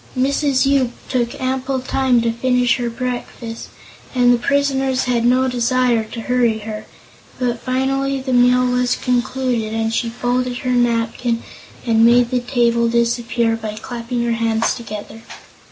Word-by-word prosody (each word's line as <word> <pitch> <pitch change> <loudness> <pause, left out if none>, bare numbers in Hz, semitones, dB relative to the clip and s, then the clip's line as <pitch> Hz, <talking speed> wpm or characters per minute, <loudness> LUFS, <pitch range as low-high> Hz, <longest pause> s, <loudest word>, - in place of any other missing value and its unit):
Mrs. 275 +1 +2
Yoop 270 -3 +2 0.2
took 240 -2 -1
ample 260 +1 -1
time 255 -1 +1
to 230 - +1
finish 250 +1 +1
her 240 -2 -2
breakfast 240 -1 -5 0.5
and 245 -1 +5
the 240 - +1
prisoners 270 -1 +1
had 245 -2 0
no 255 +2 +3
desire 250 -1 +1
to 230 +1 -7
hurry 240 -2 +1
her, 215 -1 -6 0.5
but 240 -2 -1
finally 270 +2 -1
the 260 0 -3
meal 250 +1 +4
was 250 0 +1
concluded 245 -3 -1
and 225 0 -1
she 230 0 0
folded 245 +1 -1
her 250 - +1
napkin 235 -1 0 0.4
and 225 -1 +3
made 240 +1 +5
the 250 - +1
table 235 -2 +1
disappear 235 0 +1
by 215 -1 -6
clapping 235 +2 -4
her 235 - 0
hands 230 0 +1
together. 225 -2 -8
245 Hz, 150 wpm, -19 LUFS, 230-255 Hz, 0.5 s, and